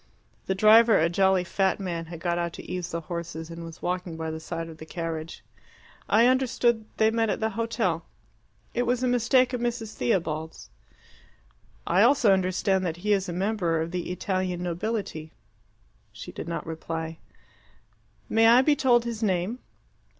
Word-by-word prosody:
The 190 - 0
driver, 220 +2 +6
a 165 +1 +3
jolly 190 +1 +3
fat 190 +3 0
man, 170 -4 -4
had 170 0 -8
got 175 0 -1
out 170 -1 -2
to - - -10
ease 180 -1 -4
the 170 -1 -3
horses, 165 -1 -6
and 165 0 -7
was 165 0 -11
walking 180 -2 -3
by 160 0 -3
the 160 - -5
side 165 +1 -5
of 160 -1 -11
the 160 - -8
carriage. 165 -1 -5 0.7
"I 230 +2 +5
understood 245 -3 +2
they 220 0 +4
met 225 -1 +1
at - - -1
the 220 0 0
hotel." 220 -7 -1 0.7
"It 245 0 0
was 250 +1 +1
a - - +2
mistake 250 +1 +3
of 245 - -2
Mrs. 235 -2 -3
Theobald's." 160 -7 -2 1.1
"I 180 +3 +3
also 235 -3 +5
understand 190 0 +1
that 170 -2 -2
he 210 - +4
is 195 -2 0
a - - -3
member 180 -3 0
of 165 +1 -3
the 180 -1 -3
Italian 185 -1 -2
nobility." 175 -3 -3 0.8
She - - -9
did - - -7
not 170 - -4
reply. 160 0 -5 1.1
"May 225 0 +4
I 240 +3 +7
be 295 +1 +4
told 250 -4 +3
his 230 -2 -4
name?" 195 +3 0
185 Hz, 170 wpm, -26 LUFS, 165-225 Hz, 1.1 s, I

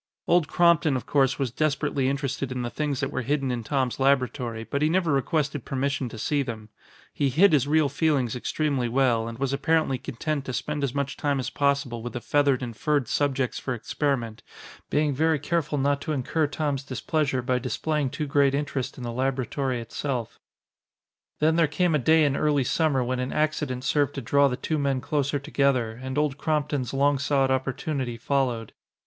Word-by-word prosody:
Old 170 -3 +3
Crompton, 170 -5 +3
of 125 - -6
course, 135 -2 +2
was 135 -4 -1
desperately 145 -1 0
interested 140 -1 -2
in 125 -1 -3
the 120 - -4
things 145 -3 -2
that 135 - -2
were - - -2
hidden 135 0 0
in 120 -2 -3
Tom's 130 0 -1
laboratory, 125 -4 +1
but 140 +6 -3
he 155 - +3
never 170 -1 +1
requested 145 0 0
permission 135 -1 -2
to 110 - -9
see 145 +6 0
them. 110 -5 -6 0.4
He 140 - +1
hid 165 +7 +5
his 140 -2 +3
real 155 0 +3
feelings 140 -6 +1
extremely 135 -1 -1
well 120 -3 +2
and 115 0 -6
was 135 +1 -1
apparently 155 -3 +1
content 145 +5 -3
to 130 - -4
spend 150 +3 -3
as 135 -2 -1
much 140 -1 -2
time 145 -2 0
as 130 - -3
possible 140 -4 0
with 120 +1 -6
the 120 - -3
feathered 140 0 +2
and 120 -2 -5
furred 145 0 0
subjects 135 -2 0
for 130 - -3
experiment, 120 -2 -2 0.5
being 150 -1 +1
very 160 +3 +2
careful 150 0 -1
not 140 +1 +1
to 155 - -2
incur 150 +3 0
Tom's 145 -2 -2
displeasure 135 0 -1
by 125 0 +1
displaying 140 +3 -1
too 150 - -3
great 140 -1 +3
interest 140 -2 -3
in 125 - -7
the 120 - -3
laboratory 130 0 -1
itself. 120 +1 -4 1.0
Then 160 +2 +2
there 165 -2 +4
came 175 +3 +1
a 150 - +3
day 160 +4 +4
in 140 -1 +1
early 145 -2 +2
summer 140 0 +1
when 125 +1 -2
an 125 +1 -2
accident 150 -4 -1
served 145 0 +1
to 135 - -3
draw 140 +4 +3
the 125 -2 -2
two 155 +2 -2
men 140 -2 +1
closer 145 0 -1
together, 140 -4 +1
and 130 +1 -4
Old 150 -1 0
Crompton's 145 -5 -1
long 140 +1 +2
sought 140 -1 +2
opportunity 130 -1 -2
followed. 120 -3 -1
140 Hz, 190 wpm, -26 LUFS, 130-150 Hz, 1.0 s, hid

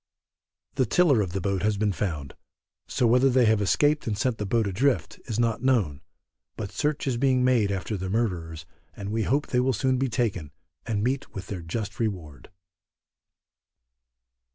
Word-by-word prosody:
The 130 -4 +2
tiller 145 -3 +4
of 95 -4 -2
the 95 - -1
boat 95 -1 -1
has 105 0 +1
been 105 0 +1
found, 80 -8 -3 0.5
so 125 - 0
whether 125 +3 +4
they 125 -1 +4
have 110 -1 +3
escaped 145 +9 +2
and 105 -2 -1
sent 125 -1 -1
the 105 - -2
boat 115 +2 +1
adrift 100 - 0
is 115 -2 -3
not 115 -1 +1
known, 105 - +1 0.6
but 105 -3 -5
search 150 -1 -1
is 130 -4 0
being 130 0 +2
made 120 -6 +3
after 100 +2 -3
the 95 -1 -4
murderers, 90 -8 -2 0.3
and 100 0 -6
we 110 +1 0
hope 140 +7 +1
they 125 - +2
will 130 +1 +2
soon 130 +3 +1
be 135 0 0
taken, 105 -9 -1 0.4
and 105 -2 -1
meet 130 +3 -2
with 95 - -5
their 95 -4 -4
just 100 +4 -5
reward. 90 - -4
110 Hz, 175 wpm, -26 LUFS, 95-125 Hz, 0.6 s, tiller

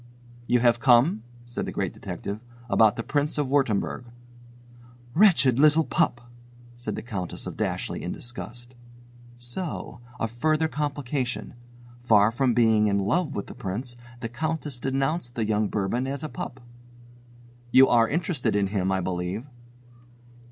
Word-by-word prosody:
"You 125 -1 +3
have 120 -1 +4
come," 120 0 +4 0.2
said 120 - -4
the - - -3
Great - - -2
Detective, 100 +1 -6 0.3
"about 110 0 +5
the 115 - -3
Prince 150 +3 0
of 145 -2 +1
Wurttemberg." 125 -4 +1 1.1
"Wretched 150 - +5
little 155 +2 +6
pup!" 120 -5 +1 0.5
said 120 0 -5
the - - -6
Countess 100 -7 -5
of - - -6
Dashleigh - - -2
in - - -4
disgust. 120 +1 -7 0.6
So! 120 +2 -5 0.2
A 115 - 0
further 155 +7 +1
complication! 140 -4 -3 0.5
Far 110 -3 +4
from 125 0 +1
being 110 -3 +4
in 100 -1 +2
love 145 - 0
with 100 - -3
the - - -10
Prince, 120 +6 -5 0.3
the 115 - -2
Countess 150 0 -3
denounced 135 0 -1
the 115 - 0
young 105 0 +1
Bourbon 105 +6 -1
as 140 +2 -3
a 155 - -3
pup! 130 -2 -6 1.1
"You 130 +2 +8
are 115 -2 +4
interested 150 - 0
in 100 -1 +2
him, 95 -2 +1
I 95 0 +1
believe." 90 +5 -3
120 Hz, 145 wpm, -26 LUFS, 110-145 Hz, 1.1 s, You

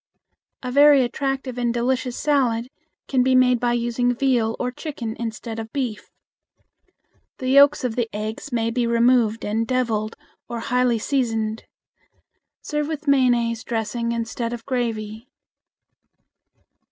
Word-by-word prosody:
A 250 - -3
very 285 0 +6
attractive 265 0 -3
and 240 -1 +1
delicious 245 +1 -1
salad 255 -5 +1 0.4
can 260 -2 +2
be 260 +1 +3
made 250 -1 +4
by 240 0 +1
using 240 +1 0
veal 240 -4 +1
or 250 - -1
chicken 245 -5 -6
instead 225 0 -5
of 225 0 -7
beef. 250 -7 -4 1.3
The 255 - -3
yolks 280 +2 +6
of 245 -3 -1
the 235 -2 -1
eggs 215 +7 -5
may 230 -1 0
be 240 0 0
removed 235 -1 +3
and 225 +2 -1
deviled 225 -4 -1 0.3
or 235 -1 -4
highly 250 0 +1
seasoned. 225 -3 -1 1.0
Serve 300 -1 -2
with 310 -1 -5
mayonnaise 240 -4 +2
dressing 235 0 -2
instead 230 0 -3
of 235 -1 -7
gravy. 230 -3 -3
240 Hz, 130 wpm, -22 LUFS, 230-255 Hz, 1.3 s, very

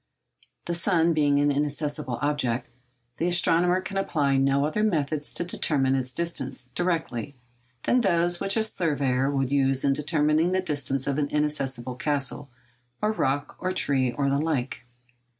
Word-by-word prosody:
The 170 - -2
sun 170 -1 +2
being 145 -2 +3
an 145 0 +3
inaccessible 145 -2 -2
object, 145 -5 0 0.5
the 170 - 0
astronomer 175 +1 +3
can 195 +1 -5
apply 145 -8 +1
no 135 +1 +2
other 155 +8 -1
methods 155 -7 0
to - - +1
determine 140 -6 0
its 130 -1 -1
distance—directly—than 130 - -3
those 175 -3 +1
which 195 +2 +1
a 220 - +3
surveyor 140 -10 0
would 135 -2 -1
use 135 -1 +2
in 140 - +3
determining 150 +3 +1
the 185 - +2
distance 145 -5 -1
of 140 +1 -1
an 145 - 0
inaccessible 135 -5 -1
castle, 140 +1 -2 0.5
or 210 - +1
rock, 145 -7 -1
or 185 - -1
tree, 135 -8 +1
or 140 +3 -1
the 140 0 +1
like. 140 -5 -2
145 Hz, 150 wpm, -26 LUFS, 135-170 Hz, 0.5 s, being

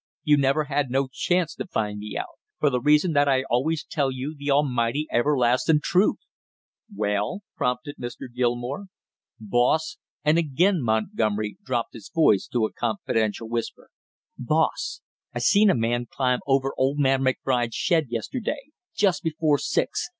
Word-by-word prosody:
You 150 -3 +5
never 140 +2 +2
had 145 -2 -1
no 135 +1 0
chance 175 +4 0
to - - -6
find 105 - -2
me 105 +1 -6
out; - - -6 0.2
for 145 - +3
the 125 -1 0
reason 150 +4 +3
that 145 0 +3
I 130 -1 +2
always 150 +5 0
tell 140 -4 0
you 130 +4 -5
the 145 0 -5
almighty 140 -1 +1
everlastin' 130 +3 +3
truth!" 185 +4 +2 0.7
"Well?" 105 - -1
prompted 125 +3 -2
Mr. 120 0 -7
Gilmore. 125 +8 -2 0.5
"Boss," 120 +9 +1 0.3
and 155 +2 +4
again 170 +4 +2
Montgomery 110 -2 -1
dropped 120 -3 -2
his 110 -4 -11
voice 150 -12 +3
to 120 -3 0
a - - -5
confidential 110 0 -1
whisper, 115 0 -5 0.5
"boss, - - 0 0.3
I - - -1
seen 200 - +4
a - - +4
man 120 +1 0
climb 125 -2 0
over 135 0 +2
old 135 +2 +1
man 135 -2 +2
McBride's 125 -2 0
shed 165 -6 +1
yesterday 255 - -4 0.2
just 195 - +2
before 155 -2 +1
six. - - -1
135 Hz, 150 wpm, -25 LUFS, 120-150 Hz, 0.7 s, You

